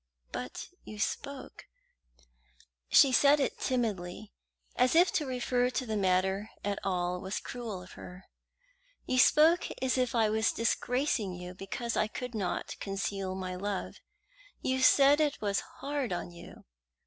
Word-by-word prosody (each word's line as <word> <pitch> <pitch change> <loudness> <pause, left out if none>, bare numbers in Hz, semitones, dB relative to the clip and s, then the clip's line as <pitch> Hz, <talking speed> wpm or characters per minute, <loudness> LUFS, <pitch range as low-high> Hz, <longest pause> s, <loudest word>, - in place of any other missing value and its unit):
"But 125 0 -6
you 215 - -9
spoke" 275 +6 -4 1.2
she 275 - +7
said 285 +3 +5
it 275 - -1
timidly, 215 -5 -2 0.4
as 250 +4 +3
if 350 +3 +6
to 300 -5 0
refer 250 -1 0
to 255 0 -2
the 220 -2 -2
matter 190 +1 +1 0.2
at 200 -1 -1
all 180 -1 -1
was 190 +1 -3
cruel 220 -7 -6
of 180 - -14
her 180 +1 -11 0.8
"you 255 - +1
spoke 320 +7 +5
as 260 0 +1
if 250 0 0
I 225 -2 +4
was 220 +1 +1
disgracing 235 -3 0
you 180 0 -8
because 195 +5 -4
I 215 - +2
could 250 +2 -6
not 200 -5 -3
conceal 195 -1 -3
my 185 -1 -4
love. 195 +1 -4 0.6
You 260 0 -1
said 280 +3 +6
it 295 -2 +1
was 200 -2 0
hard 280 -4 -4
on 175 0 -3
you." 170 - -13
220 Hz, 150 wpm, -30 LUFS, 190-260 Hz, 1.2 s, she